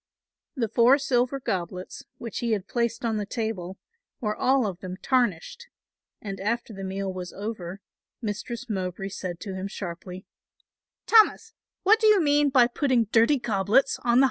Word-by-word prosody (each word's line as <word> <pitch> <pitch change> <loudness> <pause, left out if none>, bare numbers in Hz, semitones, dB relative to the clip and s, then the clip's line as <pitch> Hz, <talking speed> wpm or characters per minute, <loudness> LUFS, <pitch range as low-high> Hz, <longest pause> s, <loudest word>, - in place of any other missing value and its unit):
The 240 -5 0
four 235 +5 +5
silver 260 -1 0
goblets, 185 -5 -4
which 230 -3 -6
he 235 -2 0
had 200 -2 -2
placed 235 -1 -1
on 225 -2 0
the 205 - -2
table, 200 -6 -4 0.4
were 210 -5 -2
all 265 -2 +2
of 190 -4 -4
them 185 0 -7
tarnished; 250 - 0 0.5
and 195 -2 -6
after 230 +3 -2
the 195 -1 -7
meal 190 0 -3
was 180 -1 -6
over, 195 -3 -6 0.4
Mistress 235 +3 -5
Mowbray 190 -2 -3
said 180 -3 -6
to 200 -3 -5
him 190 +1 -4
sharply, 185 -1 -7 0.8
"Thomas, 450 0 +4 0.3
what 430 +3 +5
do 440 - +4
you 425 -2 +6
mean 290 -2 +3
by 255 -3 +5
putting 245 -3 +1
dirty 230 +6 +4
goblets 225 +2 +1
on - - -23
the 245 - -2
high - - +4
table?" - - +6
225 Hz, 170 wpm, -26 LUFS, 190-255 Hz, 0.8 s, you